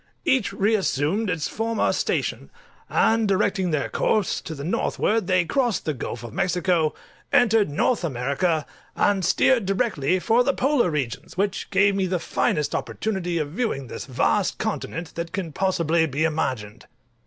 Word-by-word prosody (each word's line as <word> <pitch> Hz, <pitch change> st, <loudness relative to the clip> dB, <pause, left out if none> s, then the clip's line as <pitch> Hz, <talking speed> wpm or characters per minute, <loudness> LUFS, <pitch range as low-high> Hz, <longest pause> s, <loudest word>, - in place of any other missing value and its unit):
Each 265 Hz, -, +2 dB
reassumed 200 Hz, -2 st, +1 dB
its 160 Hz, -3 st, -1 dB
former 225 Hz, 0 st, 0 dB
station; -, -, -1 dB, 0.4 s
and 225 Hz, -1 st, +3 dB
directing 195 Hz, -1 st, +1 dB
their 150 Hz, -3 st, 0 dB
course 215 Hz, -3 st, 0 dB
to 160 Hz, -, -7 dB
the 140 Hz, -, -7 dB
northward, 205 Hz, +4 st, 0 dB
they 185 Hz, -2 st, +3 dB
crossed 245 Hz, +2 st, 0 dB
the 155 Hz, -, 0 dB
Gulf 120 Hz, -2 st, -6 dB
of 115 Hz, -2 st, -8 dB
Mexico, 180 Hz, -3 st, +1 dB, 0.4 s
entered 225 Hz, -5 st, +4 dB
North 185 Hz, -, +1 dB
America, 150 Hz, +3 st, 0 dB, 0.3 s
and 200 Hz, -2 st, +2 dB
steered 230 Hz, +4 st, +3 dB
directly 190 Hz, -, +1 dB
for 230 Hz, +6 st, +3 dB
the 275 Hz, +2 st, +1 dB
Polar 270 Hz, -7 st, +2 dB
regions, 140 Hz, -1 st, -4 dB
which 200 Hz, 0 st, -1 dB
gave 200 Hz, +1 st, +3 dB
me 195 Hz, -1 st, 0 dB
the 180 Hz, 0 st, 0 dB
finest 150 Hz, -3 st, -1 dB
opportunity 185 Hz, -5 st, -2 dB
of 150 Hz, -3 st, -2 dB
viewing 180 Hz, -, -2 dB
this -, -, -7 dB
vast 135 Hz, +10 st, +1 dB
continent 175 Hz, -6 st, -4 dB
that 170 Hz, 0 st, -5 dB
can 185 Hz, -5 st, -4 dB
possibly 170 Hz, -2 st, +1 dB
be 145 Hz, +2 st, -1 dB
imagined. 130 Hz, -10 st, -2 dB
185 Hz, 155 wpm, -24 LUFS, 155-215 Hz, 0.4 s, entered